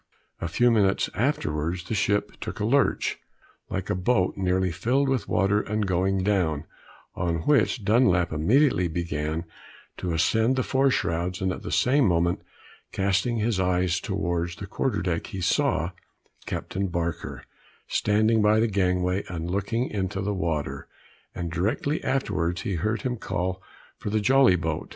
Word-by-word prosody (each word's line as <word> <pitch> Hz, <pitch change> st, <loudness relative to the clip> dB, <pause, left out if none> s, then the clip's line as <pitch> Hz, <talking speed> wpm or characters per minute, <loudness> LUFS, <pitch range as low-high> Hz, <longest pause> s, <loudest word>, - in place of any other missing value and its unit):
A 85 Hz, -, -3 dB
few 120 Hz, +8 st, +3 dB
minutes 100 Hz, -4 st, +2 dB
afterwards 85 Hz, -, -1 dB
the 90 Hz, -, -5 dB
ship 105 Hz, 0 st, +1 dB
took -, -, -5 dB
a 105 Hz, -, 0 dB
lurch, 140 Hz, +5 st, +1 dB, 0.5 s
like -, -, -3 dB
a -, -, 0 dB
boat 95 Hz, 0 st, +1 dB
nearly 95 Hz, -1 st, +1 dB
filled 125 Hz, -, +1 dB
with 130 Hz, -3 st, 0 dB
water 100 Hz, +3 st, +2 dB
and 105 Hz, 0 st, -2 dB
going 95 Hz, +1 st, +1 dB
down; 90 Hz, -7 st, +1 dB, 0.5 s
on 85 Hz, -2 st, -1 dB
which 125 Hz, -, +2 dB
Dunlap 95 Hz, -7 st, +3 dB
immediately 95 Hz, -, +3 dB
began 80 Hz, -1 st, -3 dB, 0.5 s
to 90 Hz, -, -3 dB
ascend 110 Hz, +9 st, +2 dB
the 130 Hz, -, +1 dB
fore 135 Hz, 0 st, +2 dB
shrouds, 90 Hz, -4 st, -1 dB
and 95 Hz, -2 st, 0 dB
at -, -, -5 dB
the -, -, -6 dB
same 135 Hz, 0 st, +3 dB
moment 85 Hz, 0 st, +1 dB, 0.5 s
casting 100 Hz, +5 st, +1 dB
his 110 Hz, -2 st, 0 dB
eyes 90 Hz, -1 st, +1 dB
towards 85 Hz, -3 st, -2 dB
the 100 Hz, -, -7 dB
quarter 105 Hz, +1 st, -1 dB
deck, 85 Hz, -2 st, -2 dB
he 95 Hz, -, -6 dB
saw 90 Hz, -1 st, +1 dB, 0.6 s
Captain 95 Hz, +1 st, -3 dB
Barker 85 Hz, -2 st, -3 dB, 0.4 s
standing 110 Hz, +2 st, +2 dB
by 105 Hz, +1 st, +4 dB
the 115 Hz, -, +3 dB
gangway, 90 Hz, -2 st, +1 dB
and 85 Hz, -1 st, -4 dB
looking 100 Hz, +6 st, -1 dB
into 95 Hz, -1 st, -3 dB
the 100 Hz, +1 st, -1 dB
water, 80 Hz, -5 st, -3 dB, 0.5 s
and 85 Hz, -1 st, -4 dB
directly 105 Hz, -, -1 dB
afterwards 95 Hz, -9 st, -1 dB
he 100 Hz, -, -2 dB
heard 105 Hz, +5 st, -1 dB
him 125 Hz, -1 st, -1 dB
call 95 Hz, -2 st, -3 dB, 0.4 s
for -, -, -4 dB
the 110 Hz, +1 st, +1 dB
jolly 130 Hz, -2 st, +5 dB
boat. 80 Hz, -3 st, -3 dB
95 Hz, 155 wpm, -26 LUFS, 85-110 Hz, 0.6 s, jolly